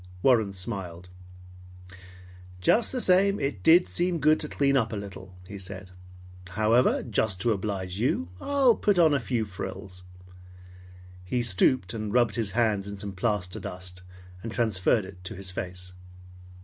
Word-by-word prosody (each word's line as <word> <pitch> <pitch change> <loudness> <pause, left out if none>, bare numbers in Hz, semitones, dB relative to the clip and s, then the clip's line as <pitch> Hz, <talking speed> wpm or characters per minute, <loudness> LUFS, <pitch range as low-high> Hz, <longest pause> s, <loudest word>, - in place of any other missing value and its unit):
Warren 115 -6 +4
smiled. 90 -3 -6 1.5
"Just 220 - +3
the 255 - -2
same, 195 -1 +3
it 125 -9 -3
did 170 - +6
seem 175 0 -1
good 155 0 +3
to 150 - -3
clean 140 -1 +1
up 115 -4 +1
little," 95 -3 -8
he 100 0 -8
said. 95 0 -9 0.6
"However, 110 +6 +2
just 105 -4 0
to 115 - +2
oblige 95 -2 -3
you 100 -7 0
I'll 275 -5 +3
put 205 -3 +1
on 160 -3 +5
a 140 - +2
few 120 -2 -1
frills." 95 -1 -7 1.2
He 120 +7 -1
stooped 105 -1 +2
and 110 -2 -4
rubbed 120 -2 +3
his 110 -4 -2
hands 110 -4 +1
in 100 0 -6
some 100 0 -4
plaster 95 -2 -2
dust, 90 0 -7 0.4
and 115 - -6
transferred 110 -2 +1
it 90 -1 -13
to 110 - -5
his 95 0 -2
face. 90 0 -6
105 Hz, 150 wpm, -27 LUFS, 95-125 Hz, 1.5 s, did